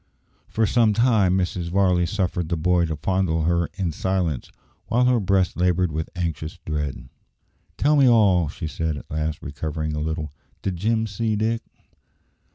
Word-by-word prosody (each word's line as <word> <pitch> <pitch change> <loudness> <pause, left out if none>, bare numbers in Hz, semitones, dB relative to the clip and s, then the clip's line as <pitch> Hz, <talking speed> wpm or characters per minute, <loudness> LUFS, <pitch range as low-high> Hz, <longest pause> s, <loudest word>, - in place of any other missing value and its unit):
For 110 - +1
some 110 0 +3
time 110 -6 +3
Mrs. 90 -2 -2
Varley 90 -2 +2
suffered 90 -4 -1
the 85 - 0
boy 90 +1 +2
to 80 - -2
fondle 85 -1 0
her 85 0 +1
in 90 -4 -1
silence, 85 -5 -1 0.4
while 125 +2 +2
her 125 -1 +4
breast 95 -2 +1
laboured 90 0 +2
with 80 +1 -3
anxious 85 -2 -3
dread. 75 -3 -3 0.7
"Tell 150 +2 +3
me 135 -3 +6
all," 100 -8 +4
she 80 - -6
said 80 -1 -2
at - - -11
last, 75 0 -2
recovering 75 +2 -4
a 75 - -2
little. 80 -1 -3 0.3
"Did 95 -3 -2
Jim 110 +4 +1
see 110 +1 -1
Dick?" 115 +2 0
90 Hz, 165 wpm, -23 LUFS, 80-100 Hz, 0.7 s, me